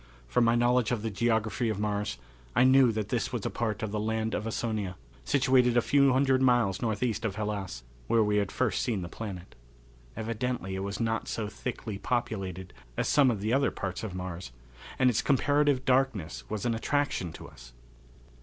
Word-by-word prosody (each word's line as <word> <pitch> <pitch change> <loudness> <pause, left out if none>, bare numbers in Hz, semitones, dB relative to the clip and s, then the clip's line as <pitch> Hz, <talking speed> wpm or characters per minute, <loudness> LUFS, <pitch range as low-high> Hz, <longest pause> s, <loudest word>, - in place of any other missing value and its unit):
From 115 - +2
my 115 0 +4
knowledge 120 -1 +3
of 115 -3 -1
the 110 - -2
geography 110 +2 0
of 105 -2 -2
Mars 105 0 -1 0.4
I - - +5
knew 130 -1 +6
that 110 -2 -3
this - - -1
was - - -3
a - - -1
part 110 -3 -2
of 110 - -2
the 105 - -1
Land 110 +1 -1
of 105 - -2
Ausonia, 110 -5 -2 0.3
situated 130 -3 +3
a - - +6
few 140 -1 +4
hundred 130 0 +3
miles 120 -7 +3
northeast 110 0 -1
of 105 -4 -2
Hellas, 100 - -4 0.2
where 115 -1 +4
we 105 0 +1
had 100 -2 0
first - - 0
seen 105 -7 -1
the - - -5
planet. 95 -3 -7 0.6
Evidently 115 -2 -3
it 95 - -3
was 100 +1 -4
not 115 -1 -1
so 110 -2 -3
thickly 105 -1 -5
populated 95 -7 -3 0.2
as - - 0
some 145 -3 +5
of 110 -5 -1
the 110 +3 0
other 140 +1 +3
parts 95 +2 -5
of 100 -4 -5
Mars, 90 -4 -6 0.5
and 130 - +4
its 120 -2 +3
comparative 145 0 +2
darkness 105 - +1
was 110 0 -3
an 120 - +2
attraction 115 - -1
to - - -10
us. - - -14
110 Hz, 190 wpm, -29 LUFS, 100-125 Hz, 0.6 s, knew